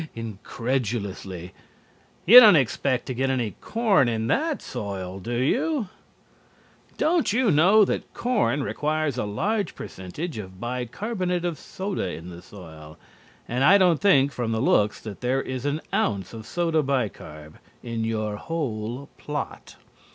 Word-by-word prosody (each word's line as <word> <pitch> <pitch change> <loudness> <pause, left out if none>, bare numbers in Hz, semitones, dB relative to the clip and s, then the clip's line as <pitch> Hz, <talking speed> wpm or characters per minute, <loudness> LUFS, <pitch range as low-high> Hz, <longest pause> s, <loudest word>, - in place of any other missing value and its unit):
incredulously. 105 -5 -4 0.7
"You 235 +8 +11
don't 215 -6 +8
expect 130 - +1
to 130 - -4
get 135 +2 0
any 125 -5 0
corn 210 - +2
in 110 -1 -1
that 310 0 +1
soil 95 -2 -6
do 120 +6 -4
you? 235 - 0 1.1
Don't 330 -4 +2
you 235 -1 +2
know 190 +8 +6
that - - -3
corn 205 - 0
requires 150 -3 -1
a - - -1
large 200 - -1
percentage 115 - -6
of 95 -2 -9
bi 125 +2 -3
carbonate 180 - -3
of 170 -4 -3
soda 190 - -4
in 85 0 -7
the 85 0 -10
soil, 80 -6 -12 0.5
and 125 +3 -1
I 195 +8 +7
don't 180 -5 +3
think, 140 -9 +4
from 120 -4 -3
the 110 - -1
looks, 105 -4 +2
that 105 -3 -8
there 130 +2 +1
is 130 +1 -4
an 145 +2 -1
ounce 100 - -1
of 110 -1 -9
soda 165 -2 +1
bi 135 -5 +1
carb. 75 -5 -12 0.2
in 115 -2 -3
your 110 -2 -2
whole 125 -4 -4
plot. 150 0 -6
130 Hz, 150 wpm, -25 LUFS, 105-175 Hz, 1.1 s, You